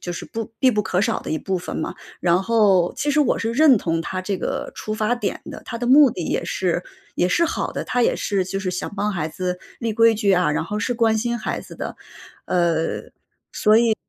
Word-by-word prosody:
就 175 - -4
是 - - -6
不 225 -1 -6
必 260 - +4
不 210 -3 0
可 185 -1 0
少 200 - 0
的 - - -7
一 155 - 0
部 190 +4 -2
分 175 - -6
嘛。 - - -3 0.2
然 180 +1 +2
后 200 -6 +3
其 295 - -2
实 300 - +3
我 280 - +2
是 225 0 -1
认 280 0 +6
同 165 -2 -1
他 185 +3 -4
这 190 +1 -2
个 - - -4
出 215 - -5
发 215 +2 +1
点 245 - -3
的， - - -9
他 230 - -5
的 240 - -3
目 275 0 +7
的 175 -5 -5
也 - - -1
是 175 -1 -1 0.3
也 180 - +1
是 335 - +3
好 330 - -2
的。 - - -4
他 250 -1 0
也 - - +2
是 195 -2 0
就 190 +2 -3
是 190 -2 -2
想 180 - -4
帮 205 +1 0
孩 160 -4 -2
子 180 +2 -4 0.2
立 230 -2 -2
规 230 +1 +5
矩 205 -2 +2
啊， 180 -3 +3
然 150 - -1
后 205 +5 -4
是 245 +4 -1
关 225 -2 +2
心 235 +2 -1
孩 - - -3
子 - - -12
的。 - - -5 0.5
呃， 170 -2 +1 0.8
所 230 - +5
以 225 -2 +2
205 Hz, 260 characters per minute, -22 LUFS, 180-230 Hz, 0.8 s, 目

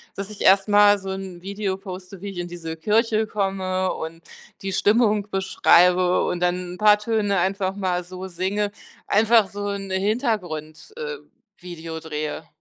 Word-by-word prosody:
dass 200 0 -5
ich 210 - -10
erst 195 +1 +5
mal 205 0 +6
so 195 - -7
'n 190 -2 -6
Video 195 0 -3
poste, 185 -1 -9
wie 200 - -5
ich 195 - -9
in 175 0 -3
diese 165 -2 -7
Kirche 220 +5 +2
komme 190 -3 -1
und 165 +1 -6 0.4
die 195 - -3
Stimmung 210 +1 +2
beschreibe, 180 -1 +4
und 175 - -2
dann 180 0 -1
'n - - -13
paar 210 0 +5
Töne 210 -3 0
einfach 190 +1 -1
mal 185 -3 -1
so 185 +1 -8
singe, 190 +3 -2 0.4
einfach 220 -1 +4
so 205 0 -5
'n 200 -1 -4
Hintergrund 190 - -2
äh, 475 0 -5 0.4
Video 165 -2 -7
drehe. 155 -1 -5
190 Hz, 160 wpm, -23 LUFS, 180-205 Hz, 0.4 s, mal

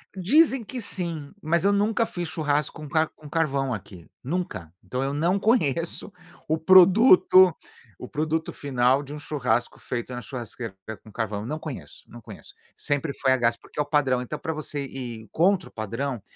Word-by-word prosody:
Dizem 265 - +3
que, 245 +3 -6
sim! 170 -7 -4
Mas 170 +3 +1
eu 200 - +5
nunca 220 +3 +2
fiz 175 -5 -5
churrasco 150 -2 0
com 150 - -7
ca 155 +2 +2
com 150 -1 -15
carvão 140 -5 0
aqui, 95 -4 -9 0.2
nunca! 135 - -4
Então, 130 +1 -3
eu 135 +1 -2
não 170 +6 +1
conheço 170 - 0 0.4
o 160 - +1
produto 185 - +7 0.4
o 125 - -9
produto 160 +2 -1
final 130 -1 +1
de 145 +1 -9
um - - -6
churrasco 125 -6 -1
feito 125 0 -5
na 125 - -5
churrasqueira 115 -2 -7 0.3
com 110 - -15
ca 115 +2 -1
carvão. 105 0 -4
Não 150 +5 -3
conheço, 155 -5 -8
não 120 - -12
conheço, - - -11 0.2
sempre 145 0 -2
foi 130 -1 +2
a 130 - +4
gás 115 -1 +2
porque - - -12
é - - +4
o - - -12
padrão, 140 -4 +1
então 125 - -5
pra 160 - -4
você 150 -2 -4
ir 120 -5 -7
contra 185 +2 +2
o - - -27
padrão, 115 +3 -4
145 Hz, 185 wpm, -25 LUFS, 125-170 Hz, 0.4 s, produto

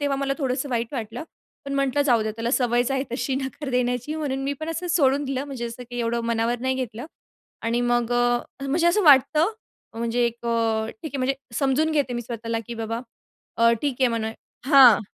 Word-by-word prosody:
तेव्हा 285 -1 0
मला 275 0 -1
थोडंसं 265 -1 -1
वाईट 235 0 -2
वाटलं. 235 +3 -5 0.4
पण 275 - -5
म्हटलं 275 +1 +1
जाऊ 240 -6 +3
द्या, 215 - -2
त्याला 230 +2 -3
सवयच 245 -1 +2
आहे 270 -1 +1
तशी 265 +1 -1
नकार 265 +1 -4
देण्याची. 250 +3 0
म्हणून 285 -4 -2
मी 280 - 0
पण 315 - -4
असं 340 +2 -4
सोडून 285 -4 +3
दिलं. 270 0 -2
म्हणजे 270 -4 -5
असं, 235 +2 -8
की 245 - -5
एवढं 235 0 0
मनावर 235 +1 0
नाही 260 0 0
घेतलं. 245 0 -5 0.6
आणि 230 +1 0
मग 240 0 +1
अ - - +2 0.5
अ, 275 - -4
म्हणजे 330 +5 +1
असं 380 +5 +3
वाटतं, 300 +6 +5 0.5
म्हणजे 235 +1 0
एक 235 0 -5
अ 225 -1 +1
ठीक 300 +8 -9
आहे 280 - -3
म्हणजे 265 +1 +1 0.2
समजून 275 +5 +1
घेते 285 -5 +1
मी 240 - -3
स्वतःला, 230 -1 -4
की 235 - -6
बाबा 230 0 -3 0.6
अ, 230 0 +5
ठीक 285 -3 0
आहे 260 - +5
म्हणा 225 -1 -2 0.3
हां, 265 -7 +8
250 Hz, 205 wpm, -24 LUFS, 235-275 Hz, 0.6 s, हां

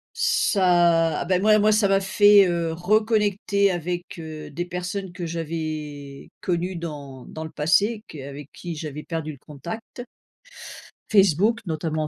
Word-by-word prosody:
Ça 170 -4 +3
ah, - - -3
bah, 185 0 +2
moi, 215 +2 +5
moi 215 +1 +4
ça 210 -1 +3
m'a 195 0 +3
fait, 205 +1 +6
heu, 170 -2 -1
reconnecter 205 +1 +2
avec, 175 0 -4
heu, 155 -2 -8
des 175 +5 -3
personnes 180 +2 -4
que 180 -1 -6
j'avais 155 -4 -5
connues 180 +1 -2
dans 145 -6 -7
dans 160 - -7
le 160 - -6
passé 200 +9 +1
que 155 - -10
avec 140 +1 -10
qui 175 -2 -6
j'avais 150 -1 -6
perdu 160 -1 -4
le 140 - -12
contact. 170 - -8 1.1
Facebook, 200 +3 +4
notamment. 155 -1 -2
175 Hz, 150 wpm, -24 LUFS, 155-200 Hz, 1.1 s, fait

